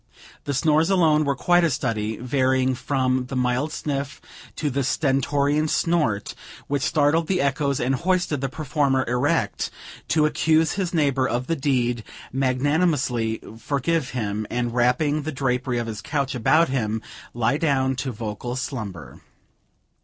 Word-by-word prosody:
The 140 - -2
snores 155 +4 +3
alone 160 -5 +3
were 140 -1 +1
quite 175 +5 +3
a 170 - +3
study, 110 -6 -2
varying 130 0 +1
from 130 -1 0
the 135 - -5
mild 125 +4 0
sniff 140 -2 -3 0.4
to 150 -2 -1
the 140 +1 0
stentorian 145 +2 +1
snort, 150 -12 0 0.3
which 140 -1 -1
startled 150 +3 +2
the 185 -2 +1
echoes 140 0 0
and 130 +2 +1
hoisted 170 -2 0
the 135 - -1
performer 140 -2 0
erect 125 +4 0 0.4
to 155 -1 +3
accuse 160 +1 +2
his 185 -3 -2
neighbor 140 -5 +2
of 125 +1 -1
the 165 - 0
deed, 125 -5 0 0.3
magnanimously 130 -3 +1 0.2
forgive 140 +2 -1
him, 110 -3 -3
and 120 -1 -2
wrapping 125 +5 +2
the 155 +2 -4
drapery 130 -2 -1
of 120 - -1
his 110 -2 -5
couch 140 0 -2
about 155 +7 +3
him, 110 -4 -1 0.3
lie 120 +4 +1
down 135 -4 +1
to 135 0 -2
vocal 115 +2 -5
slumber. 100 - -6
135 Hz, 145 wpm, -23 LUFS, 125-150 Hz, 0.4 s, snores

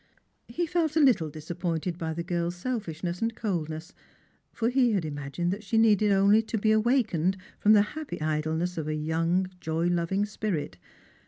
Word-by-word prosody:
He 345 - -2
felt 325 -2 0
a - - +4
httle 225 - +4
disappointed 170 +2 -3
by 160 -1 -2
the 170 - -3
girl's 175 0 -2
selfishness 180 -5 -4
and 225 0 -1
coldness; 165 -6 -3 0.6
for 230 0 0
he 250 -2 +3
had 190 -6 0
imagined 150 +4 -3
that 205 +1 -7
she 225 +2 -1
needed 215 -2 +4
only 200 +2 +5
to 225 0 -3
be 215 +1 +2
awakened 215 - +2 0.2
from 210 - +5
the 205 -1 +6
happy 310 -2 -6
idleness 155 +3 -1
of 155 - -4
a 155 - -1
young 165 +4 0
joy 160 0 -1
loving 175 +3 0
spirit. 190 - -3
180 Hz, 170 wpm, -27 LUFS, 160-220 Hz, 0.6 s, the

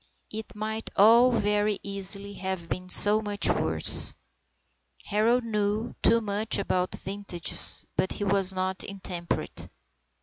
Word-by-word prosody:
It 220 0 -6
might 220 +1 -4
all 235 +5 +6
very 210 -2 +1
easily 200 0 -5
have 190 -3 -5
been 185 0 -5
so 210 +3 +7
much 205 -1 0
worse. - - +1 0.9
Harold 230 +4 +1
knew 215 +1 -2
too 230 +1 +4
much 215 +1 0
about 180 0 -1
vintages, 195 -3 -2
but 185 - 0
he - - -4
was 195 -1 +1
not 185 0 -2
intemperate. 185 -3 -4
205 Hz, 125 wpm, -27 LUFS, 190-215 Hz, 0.9 s, so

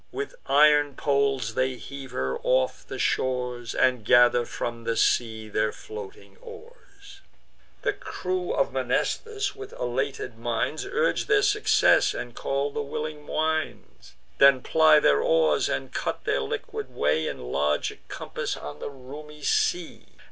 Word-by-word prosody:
With 415 +3 -5
iron 145 -1 +5
poles 135 -5 0
they 130 +2 0
heave 135 +1 -9
her 130 - -2
off - - +1
the - - -6
shores, 125 -2 -1
And 125 -3 +2
gather 120 +1 +5
from 115 -1 -5
the 115 0 -1
sea 110 -2 +1
their 110 0 0
floating 430 -1 -10
oars. 435 -4 -14 0.6
The - - +1
crew 370 +1 -4
of - - 0
Mnestheus, 420 -3 -1
with 410 0 -9
elated 125 -1 -3
minds, 120 +6 -2
Urge 475 +2 0
their 415 -1 +4
success, 415 +1 +3
and 120 -1 -6
call 140 +4 -2
the 145 - -3
willing 150 +1 -5
winds; 155 - -3 0.2
Then 140 -2 +6
ply 155 -1 +5
their 70 - +3
oars, 80 -2 +2
and - - -3
cut - - -3
their 70 - 0
liquid 65 - -5
way 75 +2 +1
In 60 0 -6
larger 75 +1 0
compass - - -4
on 75 0 -8
the - - -5
roomy 145 +3 -11
sea. 175 +3 0
140 Hz, 140 wpm, -26 LUFS, -, 0.6 s, Then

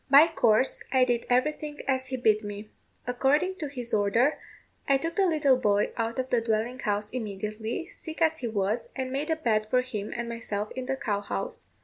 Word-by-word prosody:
By 280 +3 +9
course, 260 -7 +2
I 260 -1 +5
did 240 -1 -1
everything 295 +4 0
as 260 -1 0
he 260 0 -3
bid 215 -3 +3
me. 205 +1 -7 0.3
According 280 +9 +1
to 310 - -3
his 250 -4 -5
order, 220 +8 +3 0.5
I 275 - +5
took 330 +4 -4
the 390 0 +3
little 295 -6 +3
boy 205 -4 +2
out 230 0 -2
of 260 0 -2
the 240 - +3
dwelling 230 +3 -1
house 210 -2 -1
immediately, 220 - -4
sick 320 -2 -8
as 320 -1 +2
he 245 - -2
was, 215 +1 -1
and 260 -1 -3
made 285 +4 -2
a 320 - +3
bed 220 -8 +1
for 250 +2 +3
him 215 -5 -5
and 235 0 -3
myself 215 -3 -4
in 255 -1 -5
the 270 - 0
cow 205 -6 -1
house. 475 - -5
250 Hz, 205 wpm, -28 LUFS, 215-280 Hz, 0.5 s, By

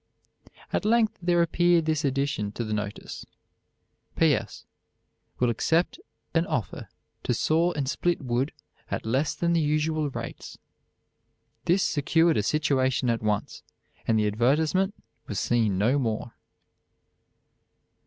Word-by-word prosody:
At - - +1
length 220 0 +2
there 175 -1 +3
appeared 170 0 +3
this 155 -1 0
addition 135 -6 -1
to 120 - -3
the 110 -1 -3
notice: 105 -1 -5 0.9
"P. - - +4
S. - - -4 0.7
Will 125 -1 +2
accept 165 - +1 0.3
an 165 +1 +2
offer 110 -7 -3 0.3
to - - 0
saw 165 +3 +2
and 145 -4 -2
split 175 +5 0
wood 130 +1 -1 0.4
at - - -3
less 130 +6 0
than 170 0 0
the 165 - +3
usual 155 0 0
rates." - - -7 1.1
This 185 +3 +3
secured 160 +3 +2
a - - +3
situation 130 -1 +1
at 115 - -1
once, 105 -2 -2 0.5
and 115 - +3
the 105 - +2
advertisement 150 - +2 0.3
was 100 - -2
seen 110 -3 +1
no 120 +8 +2
more. 115 -1 -2
145 Hz, 130 wpm, -26 LUFS, 115-165 Hz, 1.1 s, P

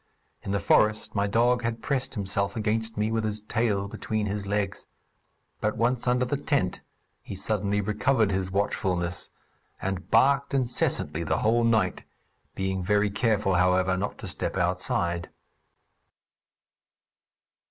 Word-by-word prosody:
In - - -7
the 100 - +1
forest 110 +1 +2
my 100 -1 +1
dog 120 +4 +3
had 115 -1 -3
pressed 135 -1 -1
himself 100 +1 -1
against 110 0 -1
me, 105 +1 0
with 115 0 0
his 105 -1 -1
tail 105 -2 0
between 110 +1 -3
his 100 0 -3
legs; 100 -1 -2 0.7
but 105 +1 -1
once 120 +1 0
under 125 +1 +3
the 140 +3 -1
tent, 140 - 0 0.4
he - - -7
suddenly 100 +1 0
recovered 110 +2 +1
his 95 -1 -1
watchfulness, 90 -3 -1 0.5
and 95 -1 -4
barked 140 +4 +3
incessantly 120 - 0
the 80 - 0
whole 115 +2 +3
night, 110 -6 +2 0.5
being 95 -1 -2
very 105 +2 +2
careful, 105 -2 +1
however, 90 +1 +3
not 100 +3 -3
to - - -7
step - - -3
outside. 85 0 0
105 Hz, 135 wpm, -27 LUFS, 95-115 Hz, 0.7 s, dog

